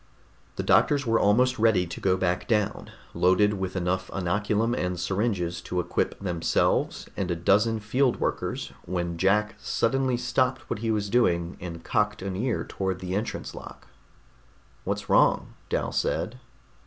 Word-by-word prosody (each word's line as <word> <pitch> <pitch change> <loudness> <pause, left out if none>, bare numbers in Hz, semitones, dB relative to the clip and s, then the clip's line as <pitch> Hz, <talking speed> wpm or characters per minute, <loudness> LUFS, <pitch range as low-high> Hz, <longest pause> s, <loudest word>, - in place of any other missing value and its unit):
The - - -3
doctors 145 -1 +3
were 115 -1 +2
almost 125 +5 +3
ready 110 -5 +4
to 85 - -8
go 95 -1 +2
back 90 -1 -1
down, 105 -4 0 0.2
loaded 95 +3 +3
with 95 0 -3
enough 95 +1 -1
inoculum 105 +5 0
and 90 -5 -2
syringes 90 -2 -1
to 90 +1 -3
equip 90 - -1
themselves 90 -4 0
and 95 -2 -2
a 85 - 0
dozen 105 +6 +2
field 125 +4 +1
workers - - -2
when 85 -2 -3
Jack 105 +3 +2
suddenly 130 +1 0
stopped 130 +3 0
what - - -1
he 115 +1 -2
was 105 -2 0
doing 90 -6 +1
and 85 -2 -7
cocked 105 -3 0
an 95 -1 -3
ear 115 +4 -1
toward 95 -1 -2
the 90 0 -5
entrance 105 +4 -3
lock. - - -11 1.0
"What's - - -2
wrong?" - - +3 0.2
Dal - - -1
said. 105 +10 -1
100 Hz, 155 wpm, -26 LUFS, 90-115 Hz, 1.0 s, ready